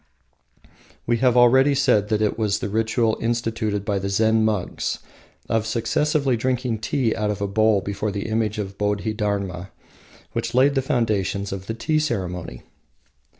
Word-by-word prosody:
We 120 - +1
have 125 0 +3
already 130 +4 +5
said 125 -7 +3
that 110 -1 +1
it 105 - +1
was 105 -3 0
the 100 - -4
ritual 110 +1 0
instituted 115 -3 -1
by 100 -2 0
the 100 +1 -3
Zen 110 +2 +2
monks 105 -4 -1 0.5
of 110 -1 0
successively 135 +4 +1
drinking 125 -1 -1
tea 120 0 0
out 105 -1 -1
of 105 - -2
a 100 - -1
bowl 110 0 +3
before 100 +2 -3
the 100 0 -4
image 110 -1 -1
of 100 -2 -5
Bodhi 105 +1 -1
Dharma, 100 -3 -3 0.6
which 115 +1 -3
laid 135 +3 +5
the 135 - +1
foundations 105 -7 -1
of 95 0 -6
the 115 - -3
tea 155 +7 0
ceremony. 90 - -3
110 Hz, 160 wpm, -23 LUFS, 100-120 Hz, 0.6 s, already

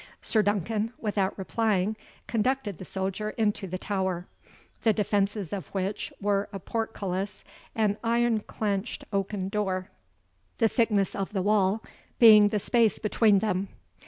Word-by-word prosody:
Sir 220 - +2
Duncan, 210 +2 0
without 205 -3 -1
replying, 210 0 0 0.3
conducted 230 -4 -1
the 185 - -7
soldier 195 +3 -3
into 210 -3 0
the 185 +1 -4
tower; 190 -2 -2 0.6
the 220 - +4
defences 205 -2 0
of 195 -3 -4
which 195 +2 -2
were 200 0 0
a 200 - -5
portcullis 195 -2 -3 0.3
and 210 -2 +1
ironclenched 225 -3 0
oaken 195 -1 -1
door, 190 -2 -2 0.7
the 225 - +4
thickness 210 -4 +1
of 195 +1 -3
the 190 -3 0
wall 205 +1 +2 0.3
being 215 -3 +8
the 210 - 0
space 225 +1 +2
between 210 -1 +3
them. 195 -1 0
205 Hz, 130 wpm, -27 LUFS, 195-220 Hz, 0.7 s, being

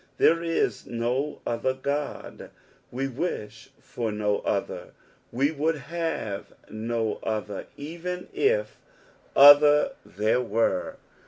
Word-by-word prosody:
There 165 +1 +4
is 165 -1 -1
no 125 +5 -2
other 130 +3 -1
Ood, 145 +1 -4 0.4
we 135 +2 -2
wish 115 -6 -5
for 115 -3 -4
no 105 -1 0
other, - - -3 0.4
we 135 +5 +1
would 160 +1 0
have 150 -8 -4 0.2
no 110 0 -2
other 105 -2 -4
even 170 +4 -6
if - - +1 0.6
other 145 - +8
there 110 +4 0
were. 110 -5 0
135 Hz, 105 wpm, -26 LUFS, 110-160 Hz, 0.6 s, other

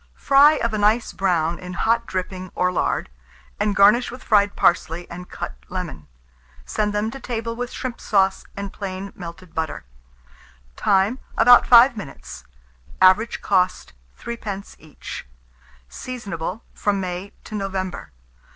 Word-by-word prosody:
Fry 280 +2 +6
of 235 -7 -1
a 215 - -1
nice 215 +3 +2
brown 170 -3 0
in 180 0 -8
hot 230 +5 +1
dripping 185 0 -4
or 180 0 +1
lard, 180 - -1 0.5
and 205 0 +1
garnish 210 +4 +5
with 250 - -10
fried 205 -1 +3
parsley 170 0 +1
and 180 +1 -8
cut - - -6 0.2
lemon. 175 - -6 0.6
Send 210 - -1
them 210 +2 -1
to 270 - -8
table 230 -2 -4
with 245 +1 -4
shrimp 250 -1 -6
sauce 195 -2 +2
and 200 -1 -5
plain 195 0 -6
melted 170 0 -10
butter. 160 - -3 0.9
Time. 200 - +2 0.2
About 245 +2 +7
5 245 +1 +8
minutes. 100 - -9 0.5
Average 190 +5 +4
cost, 185 - 0 0.3
3d. 210 -4 -6
each. 155 - -9 0.6
Seasonable 200 - -6
from 205 -1 0
May 185 +1 -5
to - - -11
November. 195 -2 -4
200 Hz, 135 wpm, -22 LUFS, 180-225 Hz, 0.9 s, 5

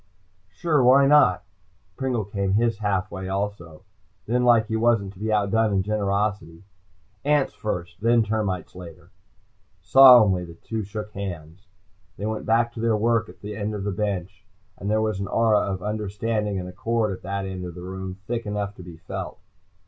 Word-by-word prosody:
"Sure, 150 - +1
why 135 +3 +6
not?" 140 -11 +5 0.5
Pringle 125 -4 -2
came 100 -1 -2
his 115 0 +1
half 100 -2 -1
way 95 0 -6
also. 95 -5 -4 0.4
Then, 125 +3 0
like 120 -2 +5
he 110 0 -3
wasn't 110 -4 +1
to 95 - -17
be 110 +1 -2
outdone 105 +1 +2
in 95 -1 +1
generosity. 100 -4 -2 0.6
"Ants 145 -1 +2
first, 90 -4 -5
then 115 +1 +4
termites 105 -4 -2
later." 90 -3 -12 0.7
Solemnly 120 -9 +7
the 85 -1 -10
two 110 +5 -5
shook 105 +1 -6
hands. 90 -2 -7 0.5
They 100 - -5
went 110 0 -4
back 115 +1 +2
to - - -8
their 115 -1 +1
work 115 +1 +1
at - - -15
the 105 -1 -4
bench, 100 -2 -3 0.3
and 100 - -5
there 110 +1 +2
was 110 -3 -1
an 100 - -3
aura 110 -2 +3
of 95 -2 -3
understanding 105 0 -2
and 90 - -6
accord 110 +4 -1
at - - -15
that 100 +1 -4
end 95 -1 -5
of 90 -2 -7
the 90 - -9
room 95 0 -6
thick 115 0 -3
enough 105 -1 -3
to - - -10
be 85 -2 -11
felt. 85 - -7
105 Hz, 170 wpm, -24 LUFS, 95-110 Hz, 0.7 s, Solemnly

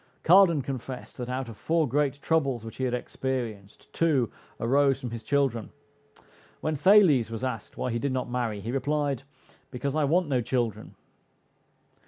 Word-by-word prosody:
Cardan 170 -4 +6
confessed, 130 -1 -6
that 125 -1 -5
out 130 0 -3
of 115 - -9
four 160 +6 +1
great 140 +2 0
troubles 140 -8 +1
which 115 - -9
he 130 - -1
had 125 - -1
experienced, 120 -6 -5
two 145 -9 +2 0.3
arose 135 +2 +3
from 125 -4 -6
his 115 -1 -6
children. 135 -3 0 0.9
When 155 0 -1
Thales 155 - +5
was 115 +2 -5
asked 125 -5 -4
why 125 - -2
he 115 - -1
did 140 +2 -1
not 130 0 -2
marry, 120 -4 -2
he 115 +4 -4
replied, 140 0 -1 0.5
"because 140 +2 -3
I 155 -2 +2
want 170 +4 +2
no 130 -4 +1
children." 115 -3 -2
130 Hz, 165 wpm, -27 LUFS, 120-145 Hz, 0.9 s, Cardan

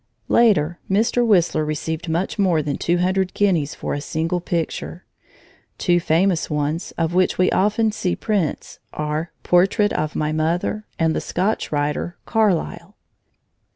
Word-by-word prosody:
Later, 175 -8 +3
Mr. 225 +5 +2
Whistler 175 -8 +3
received 155 +2 -3
much 175 +6 -2
more 175 -6 +2
than 145 -1 -2
two 175 +1 0
hundred 185 +1 0
guineas 165 -7 +1
for - - -4
a 145 - -3
single 165 +4 -2
picture. 170 +1 -3 0.7
Two 175 -1 +2
famous 170 +2 +1
ones, 150 +3 -2
of 165 0 0
which 185 0 +2
we 185 - +3
often 210 +3 +2
see 185 -4 -1
prints, 200 -8 -2
are 150 +2 -3
"Portrait 195 +4 +3
of 155 0 -2
my 155 0 0
Mother" 170 +7 -1
and 160 -1 +1
the - - -1
Scotch 195 +5 -1
writer, 150 +3 -2
"Carlyle." 205 -3 0
175 Hz, 145 wpm, -21 LUFS, 155-195 Hz, 0.7 s, Later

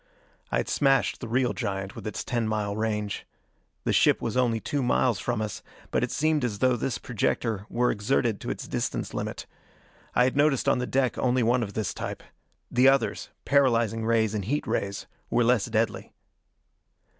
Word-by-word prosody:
I - - +2
had - - -1
smashed 135 -2 +2
the 120 - -6
real 125 +2 +1
giant, 95 +2 -3
with 110 -3 -7
its 105 - -4
ten 120 -3 -1
mile 105 -2 -1
range. 105 -1 -2 0.6
The - - 0
ship - - +4
was - - -3
only 120 -3 +2
two 145 +5 -2
miles 120 -3 +2
from 120 -3 -1
us, 105 -2 -5 0.3
but - - +1
it - - 0
seemed 155 -1 +1
as 110 -4 -1
though 130 +3 +3
this 120 +2 -2
projector 110 -2 -1
were 125 +1 +2
exerted 105 -9 0
to - - -5
its - - -4
distance - - -3
limit. - - -4 0.7
I 125 - +5
had 130 +2 +1
noticed 145 -2 +2
on - - +3
the 125 - -2
deck 130 -2 0
only 125 -1 +2
one 120 +2 +3
of 100 -3 -4
this 105 -5 -2
type. - - -5 0.5
The 125 +2 +5
others, 135 0 +2 0.2
paralyzing 115 -5 +3
rays 110 -2 +2
and 105 -3 -2
heat 145 +7 -1
rays, 100 0 -2 0.2
were 120 - +3
less 120 -2 +3
deadly. 115 -1 -1
115 Hz, 185 wpm, -27 LUFS, 110-130 Hz, 0.7 s, I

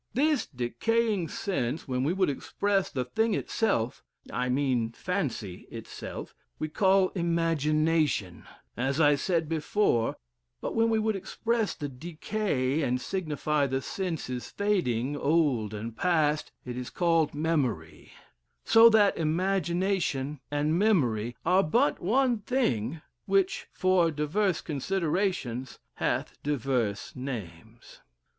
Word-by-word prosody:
This 290 -1 +2
decaying 180 - 0
sense, 155 - -2
when 130 -1 -1
we 145 - +1
would 185 0 +2
express 195 +7 -1
the 130 -2 -2
thing 220 - +1
itself 125 - -1 0.3
(I 125 0 -1
mean 125 -4 +1
fancy 130 - -3
itself), - - -8 0.2
we 155 - -3
call 190 +2 +3
imagination, 160 - +1 0.3
as 135 +4 -1
I 145 -2 +6
said 165 +2 0
before, 155 - +1 0.4
but - - -4
when 230 0 +3
we 225 - +2
would 220 -1 +1
express 225 +3 -1
the 145 - -4
Decay, 155 0 -2
and 125 -3 0
signify 150 -3 -1
the 135 0 -1
sense 175 +3 -3
is 125 -1 -5
fading, 145 - 0
old 140 -8 +1
and 110 +2 -6
past, 155 -1 +1
it 125 -1 -5
is 125 -1 -5
called 165 -4 +1
Memory: 135 - -2 0.5
so 225 0 +8
that 210 -3 +4
imagination 170 -3 0
and 150 +3 +1
memory 120 - +2
are 180 +3 +5
but 235 - +2
one 245 +4 +2
thing, 160 - -1 0.2
which, 195 -1 +1
for 185 -3 +3
divers 160 +5 0
considerations, 155 - -2 0.2
hath - - -2
divers 125 -8 -1
names." 110 -4 -8
155 Hz, 120 wpm, -28 LUFS, 130-195 Hz, 0.5 s, so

